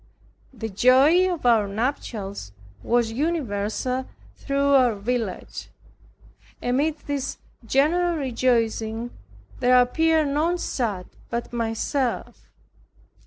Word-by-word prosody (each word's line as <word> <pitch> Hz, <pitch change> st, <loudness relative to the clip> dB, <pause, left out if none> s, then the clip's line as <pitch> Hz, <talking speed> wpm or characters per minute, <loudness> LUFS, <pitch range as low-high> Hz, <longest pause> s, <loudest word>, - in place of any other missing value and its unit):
The 225 Hz, -4 st, -6 dB
joy 270 Hz, -, +4 dB
of 340 Hz, -7 st, -5 dB
our 225 Hz, -4 st, +4 dB
nuptials 200 Hz, -, -4 dB, 0.3 s
was 235 Hz, -1 st, +1 dB
universal 255 Hz, -3 st, -2 dB, 0.3 s
through 280 Hz, 0 st, 0 dB
our 250 Hz, -5 st, +4 dB
village. 220 Hz, -1 st, -4 dB, 0.9 s
Amid 285 Hz, +5 st, 0 dB
this 280 Hz, -1 st, -3 dB, 0.3 s
general 340 Hz, +7 st, +2 dB
rejoicing, 235 Hz, -4 st, 0 dB, 0.5 s
there 250 Hz, 0 st, +5 dB
appeared 315 Hz, +4 st, +2 dB
none 320 Hz, +5 st, +1 dB
sad 215 Hz, -, -2 dB, 0.2 s
but 235 Hz, +1 st, -4 dB
myself. 235 Hz, +3 st, -2 dB
250 Hz, 90 wpm, -24 LUFS, 225-285 Hz, 0.9 s, there